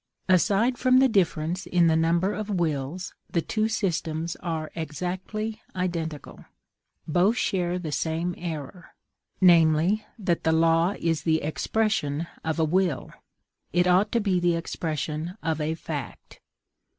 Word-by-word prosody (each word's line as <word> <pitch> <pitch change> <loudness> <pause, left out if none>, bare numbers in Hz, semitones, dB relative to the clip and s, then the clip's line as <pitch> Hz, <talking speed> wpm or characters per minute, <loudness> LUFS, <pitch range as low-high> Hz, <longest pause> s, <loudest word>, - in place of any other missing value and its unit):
Aside 205 +7 +3
from 255 0 +4
the 265 +1 +6
difference 180 -4 0
in 175 -1 +3
the 160 -1 +4
number 170 +5 +2
of 215 0 -4
wills, 170 -2 -2 0.2
the 170 - 0
two 220 -1 0
systems 170 -6 -2
are 160 -3 -4
exactly 185 +7 -4
identical: 170 -5 -4 0.6
both 180 +8 +3
share 180 -2 0
the 165 -4 -5
same 165 +4 -1
error, 165 0 -7 0.5
namely, 170 +3 +5
that 185 -6 -1
the 160 - +3
law 165 +3 +3
is 165 -2 0
the 160 -1 +1
expression 160 -2 0 0.2
of 160 0 -1
a 160 - +3
will; 175 -4 0 0.6
it 175 0 +3
ought 185 +4 +3
to 235 - +3
be 195 -4 +1
the 175 -1 +2
expression 160 +1 -3
of 160 -1 -1
a 155 +2 -1
fact. 150 -5 -7
170 Hz, 140 wpm, -26 LUFS, 160-190 Hz, 0.6 s, the